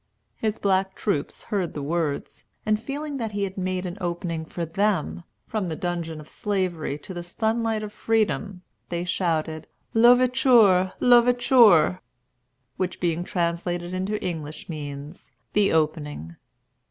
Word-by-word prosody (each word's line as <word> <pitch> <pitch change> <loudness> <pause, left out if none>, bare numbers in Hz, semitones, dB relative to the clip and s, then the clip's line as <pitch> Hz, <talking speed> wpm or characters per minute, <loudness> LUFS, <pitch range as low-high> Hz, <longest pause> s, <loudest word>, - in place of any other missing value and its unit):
His 220 -1 -2
black 190 -1 +1
troops 155 -9 -2
heard 195 -6 -2
the 145 - -4
words, 155 -1 -2 0.2
and 215 0 +1
feeling 285 +2 -4
that 225 -4 -3
he 200 0 -1
had 190 -1 -3
made 185 -1 -2
an 180 +3 -6
opening 170 -2 -3
for 170 +1 -4
them, 185 0 0 0.2
from 215 -4 -2
the 160 - -3
dungeon 170 -2 -3
of 150 - -11
Slavery 180 -8 -2
to 185 +6 -8
the 175 - -5
sunlight 220 +4 -1
of 210 0 -7
Freedom, 210 -4 0 0.3
they 170 0 -2
shouted, 160 -3 -1 0.3
"L'Ouverture," 240 -5 +5
"L'Ouverture"; 240 - +5 0.8
which, 185 -1 -2
being 170 -1 0
translated 175 0 -2
into 190 +3 -2
English, 155 -3 -5
means 145 0 -8 0.2
The 205 -1 +3
Opening. 150 - -1
185 Hz, 135 wpm, -25 LUFS, 165-215 Hz, 0.8 s, L'Ouverture